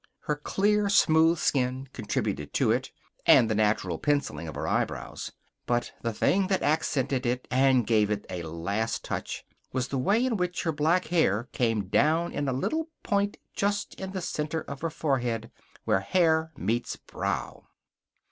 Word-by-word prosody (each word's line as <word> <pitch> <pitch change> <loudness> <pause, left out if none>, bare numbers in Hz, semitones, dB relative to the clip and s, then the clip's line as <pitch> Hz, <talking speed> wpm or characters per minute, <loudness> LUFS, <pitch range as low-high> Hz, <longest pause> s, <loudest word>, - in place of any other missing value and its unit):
Her 150 - -1
clear, 205 +7 +1
smooth 165 -3 +5
skin 130 -2 0
contributed 75 -1 -3
to - - +3
it, - - 0 0.4
and 115 - +7
the 110 - 0
natural 105 -5 +1
penciling 140 - 0
of 80 - -7
her - - -3
eyebrows. - - -2 0.4
But 120 0 0
the 115 - -1
thing 190 - +2
that 190 -1 0
accented 140 -3 +1
it, 125 +1 -1
and 130 -2 +4
gave 105 -2 +3
it 105 -1 -2
a 90 -1 -5
last 85 +8 -2
touch, - - -4 0.3
was 130 -1 -2
the 135 - -1
way 210 - +2
in 240 -4 0
which 180 -1 -1
her 165 - +1
black 160 +5 +2
hair 120 - +2
came 115 -5 0
down 160 - +2
in 145 -1 -2
a - - +1
little 315 - -1
point 200 -1 0 0.2
just 205 0 -1
in 190 - -6
the 190 -1 -4
center 155 -1 -2
of 140 -2 -8
her 165 - -1
forehead, 125 -7 -1 0.3
where - - +3
hair 160 - +2
meets 115 +6 -1
brow. - - -4
140 Hz, 165 wpm, -28 LUFS, 115-170 Hz, 0.4 s, and